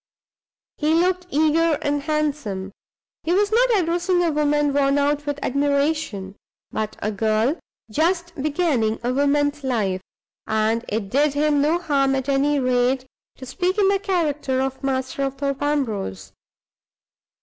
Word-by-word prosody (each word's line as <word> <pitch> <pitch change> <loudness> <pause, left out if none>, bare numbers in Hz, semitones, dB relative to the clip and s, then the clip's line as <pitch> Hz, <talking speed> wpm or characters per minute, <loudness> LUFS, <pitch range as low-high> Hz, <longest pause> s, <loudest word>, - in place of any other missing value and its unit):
He 310 +2 +2
looked 360 +1 +1
eager 315 0 +2
and 290 -2 -1
handsome. 285 -11 -2 0.5
He 335 - 0
was 405 +2 +2
not - - +4
addressing 350 +1 +1
a 335 - +2
woman 295 -1 +1
worn 275 0 +2
out 290 +1 0
with 290 -1 -1
admiration, 280 -8 0 0.4
but 215 -1 -3
a 215 - 0
girl 220 - +1 0.3
just 345 - 0
beginning 285 -7 0
a 245 +1 0
woman's 285 +1 +1
life; 210 -8 -1 0.5
and 220 +1 +1
it 210 -2 -2
did 285 +1 +2
him 295 -1 +2
no 310 +4 +2
harm, 275 -5 +1
at 265 +1 -2
any 280 +1 +2
rate, 255 0 +1 0.3
to 260 - -9
speak 360 +9 -1
in 395 -2 +4
the 395 0 +2
character 305 -9 -1
of 265 +1 -3
master 265 0 -2
of 275 -1 -1
Thorpe 275 0 -2
Ambrose. 220 - -2
285 Hz, 145 wpm, -22 LUFS, 255-315 Hz, 0.5 s, not